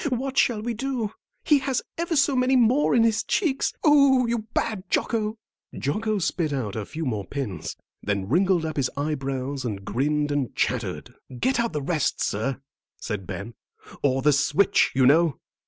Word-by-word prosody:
"What 260 Hz, +1 st, -2 dB
shall 225 Hz, -5 st, +2 dB
we 240 Hz, +1 st, -2 dB
do? 235 Hz, -3 st, -3 dB, 0.3 s
He 295 Hz, -2 st, +4 dB
has 265 Hz, -2 st, -1 dB
ever 335 Hz, 0 st, -2 dB
so 280 Hz, -1 st, +3 dB
many 255 Hz, +1 st, +3 dB
more 250 Hz, +3 st, +4 dB
in 230 Hz, -, +5 dB
his 225 Hz, -1 st, +2 dB
cheeks. 315 Hz, -10 st, 0 dB
Oh, 280 Hz, -4 st, +5 dB
you 230 Hz, -2 st, -2 dB
bad 210 Hz, -4 st, -2 dB
Jocko!" 220 Hz, -1 st, 0 dB, 0.4 s
Jocko 215 Hz, -, -1 dB
spit 170 Hz, -3 st, -1 dB
out 120 Hz, -8 st, -3 dB
a 110 Hz, -2 st, -4 dB
few 160 Hz, 0 st, -5 dB
more 110 Hz, -6 st, -2 dB
pins, 105 Hz, -, -5 dB, 0.3 s
then 100 Hz, -2 st, -2 dB
wrinkled 175 Hz, -, +2 dB
up 155 Hz, -1 st, -4 dB
his 135 Hz, -3 st, +1 dB
eyebrows 135 Hz, -2 st, -2 dB
and 100 Hz, -5 st, -4 dB
grinned 145 Hz, +6 st, 0 dB
and 145 Hz, -4 st, -2 dB
chattered. -, -, -2 dB, 0.3 s
"Get 260 Hz, -, +1 dB
the 150 Hz, -2 st, -3 dB
rest 155 Hz, -2 st, 0 dB
out, -, -, -9 dB
sir," 130 Hz, +6 st, -2 dB, 0.4 s
said 105 Hz, -5 st, -5 dB
Ben, 100 Hz, +5 st, -6 dB, 0.5 s
"or 135 Hz, -2 st, +1 dB
the 150 Hz, 0 st, +5 dB
switch, 150 Hz, +7 st, +3 dB
you 130 Hz, -1 st, +4 dB
know." 155 Hz, +1 st, +4 dB
160 Hz, 170 wpm, -25 LUFS, -, 0.5 s, in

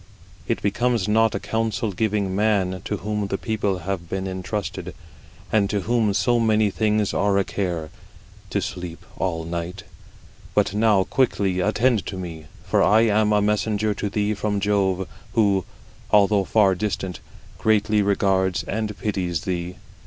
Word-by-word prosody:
It -, -, -1 dB
becomes 115 Hz, 0 st, +1 dB
not 110 Hz, +1 st, +3 dB
a -, -, -1 dB
counsellor, 110 Hz, -2 st, -1 dB
to 100 Hz, -1 st, 0 dB
whom 105 Hz, -1 st, -1 dB
the 95 Hz, -, -2 dB
people 105 Hz, -4 st, -1 dB
have 90 Hz, -1 st, -4 dB
been 95 Hz, 0 st, -3 dB
intrusted, 95 Hz, +1 st, -4 dB, 0.6 s
and 100 Hz, -2 st, +2 dB
to 105 Hz, -1 st, 0 dB
whom 110 Hz, -1 st, +1 dB
so 120 Hz, +4 st, +2 dB
many 110 Hz, -2 st, +3 dB
things 105 Hz, 0 st, +1 dB
are 100 Hz, -1 st, +2 dB
a 100 Hz, -, +3 dB
care, 85 Hz, -6 st, -3 dB, 0.6 s
to -, -, 0 dB
sleep 90 Hz, -2 st, -6 dB
all 85 Hz, -3 st, -1 dB
the 80 Hz, -, -8 dB
night. 85 Hz, +2 st, -4 dB, 0.7 s
But -, -, +2 dB
now 105 Hz, -2 st, +3 dB
quickly 100 Hz, -6 st, +1 dB
attend 110 Hz, +3 st, +2 dB
to 95 Hz, -, -5 dB
me; 80 Hz, -4 st, -7 dB, 0.2 s
for -, -, +2 dB
I 110 Hz, +2 st, +5 dB
am 110 Hz, -1 st, +3 dB
a 105 Hz, -1 st, +3 dB
messenger 105 Hz, 0 st, +1 dB
to 105 Hz, +1 st, -3 dB
thee 105 Hz, +1 st, 0 dB
from 105 Hz, 0 st, -1 dB
Jove, 95 Hz, -2 st, +1 dB, 0.3 s
who, 100 Hz, -6 st, +2 dB, 0.4 s
although 100 Hz, -1 st, +4 dB
far 100 Hz, -1 st, +4 dB
distant, 95 Hz, -1 st, -3 dB, 0.4 s
greatly 105 Hz, -1 st, +2 dB
regards 95 Hz, -2 st, +1 dB
and 105 Hz, 0 st, -3 dB
pities 90 Hz, -6 st, -2 dB
thee. 90 Hz, -1 st, -3 dB
100 Hz, 150 wpm, -23 LUFS, 95-105 Hz, 0.7 s, I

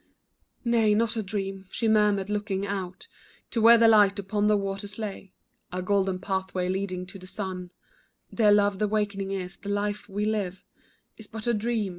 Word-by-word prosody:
"Nay, 225 Hz, -3 st, +3 dB
not 230 Hz, +1 st, +1 dB
a 225 Hz, -, 0 dB
dream," 195 Hz, -1 st, -4 dB
she 225 Hz, -, -1 dB
murmured, 210 Hz, -3 st, +3 dB
looking 205 Hz, -1 st, -2 dB
out 190 Hz, -2 st, -5 dB, 0.4 s
To 230 Hz, -, 0 dB
where 230 Hz, +1 st, +8 dB
the 230 Hz, 0 st, +6 dB
light 205 Hz, -2 st, +5 dB
upon 205 Hz, +1 st, 0 dB
the 210 Hz, 0 st, +4 dB
waters 200 Hz, +1 st, -4 dB
lay, 200 Hz, -3 st, -6 dB, 0.4 s
A 180 Hz, 0 st, -3 dB
golden 195 Hz, -1 st, +1 dB
pathway 190 Hz, -1 st, -2 dB
leading 185 Hz, -1 st, -2 dB
to 190 Hz, +2 st, -11 dB
the 185 Hz, -, -12 dB
sun, 185 Hz, -2 st, -5 dB, 0.6 s
"Dear 215 Hz, -3 st, +4 dB
love 205 Hz, -1 st, +3 dB
the 210 Hz, -, +2 dB
wakening 205 Hz, -2 st, -1 dB
is, 190 Hz, -1 st, -5 dB
this 200 Hz, -, -5 dB
life 205 Hz, +1 st, -2 dB
we 205 Hz, +2 st, -2 dB
live 200 Hz, -4 st, -2 dB, 0.5 s
Is 220 Hz, -, -10 dB
but 220 Hz, 0 st, -7 dB
a 240 Hz, -, +2 dB
dream." 220 Hz, -1 st, -1 dB
205 Hz, 180 wpm, -27 LUFS, 190-215 Hz, 0.6 s, where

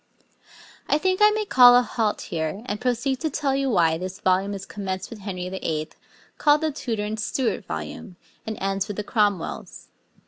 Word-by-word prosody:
I -, -, +4 dB
think 370 Hz, +4 st, 0 dB
I 420 Hz, -, +8 dB
may 425 Hz, 0 st, -1 dB
call 245 Hz, -8 st, +8 dB
a 245 Hz, -, +5 dB
halt 220 Hz, -3 st, -1 dB
here, 160 Hz, +6 st, -4 dB
and 205 Hz, -3 st, -4 dB
proceed 250 Hz, +1 st, 0 dB
to 315 Hz, -, -1 dB
tell 275 Hz, -1 st, -1 dB
you 275 Hz, 0 st, 0 dB
why 165 Hz, -7 st, +3 dB
this 185 Hz, +2 st, -6 dB
volume 190 Hz, +2 st, +1 dB
is 195 Hz, 0 st, -7 dB
commenced 190 Hz, -1 st, -5 dB
with 225 Hz, -, -8 dB
Henry 185 Hz, -3 st, -5 dB
VII., 160 Hz, -4 st, -3 dB, 0.5 s
called 295 Hz, 0 st, +4 dB
the 315 Hz, -1 st, 0 dB
Tudor 225 Hz, -6 st, -3 dB
and 215 Hz, +1 st, -4 dB
Stuart 235 Hz, +3 st, -1 dB
volume, 190 Hz, -5 st, -6 dB, 0.3 s
and 220 Hz, -1 st, -5 dB
ends 195 Hz, 0 st, -1 dB
with 205 Hz, -, -6 dB
the 210 Hz, -, -2 dB
Cromwells. 205 Hz, -4 st, -1 dB
210 Hz, 185 wpm, -24 LUFS, 190-260 Hz, 0.5 s, I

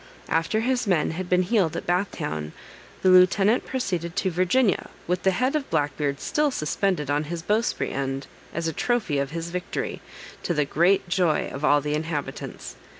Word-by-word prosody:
After 165 Hz, +7 st, +1 dB
his 245 Hz, -1 st, 0 dB
men 175 Hz, -6 st, +2 dB
had 180 Hz, +2 st, -5 dB
been 180 Hz, 0 st, +4 dB
healed 185 Hz, -4 st, +1 dB
at -, -, -5 dB
Bath 180 Hz, +3 st, +1 dB
town, 75 Hz, 0 st, -4 dB, 0.5 s
the 190 Hz, -, +5 dB
lieutenant 195 Hz, +5 st, +5 dB
proceeded 180 Hz, -9 st, -2 dB
to 190 Hz, -1 st, 0 dB
Virginia, 185 Hz, +5 st, +2 dB, 0.2 s
with 180 Hz, +1 st, -1 dB
the 190 Hz, -, +3 dB
head 255 Hz, +9 st, +1 dB
of 295 Hz, -3 st, -2 dB
Black 145 Hz, -4 st, 0 dB
Beard 140 Hz, -2 st, -1 dB
still 300 Hz, -, +1 dB
suspended 155 Hz, -, -1 dB
on 145 Hz, +1 st, +1 dB
his 165 Hz, +1 st, -5 dB
bowsprit 215 Hz, +5 st, 0 dB
end, 135 Hz, 0 st, -3 dB, 0.3 s
as 165 Hz, 0 st, -2 dB
a 160 Hz, -, -2 dB
trophy 210 Hz, -, 0 dB
of 140 Hz, 0 st, -1 dB
his 165 Hz, +2 st, -5 dB
victory, 180 Hz, 0 st, -4 dB, 0.4 s
to 175 Hz, -, -1 dB
the 150 Hz, -1 st, +2 dB
great 175 Hz, +7 st, +2 dB
joy 175 Hz, -3 st, +1 dB
of 140 Hz, -, -6 dB
all 145 Hz, -1 st, +4 dB
the 150 Hz, +1 st, -2 dB
inhabitants. 150 Hz, -3 st, -4 dB
175 Hz, 185 wpm, -25 LUFS, 150-195 Hz, 0.5 s, the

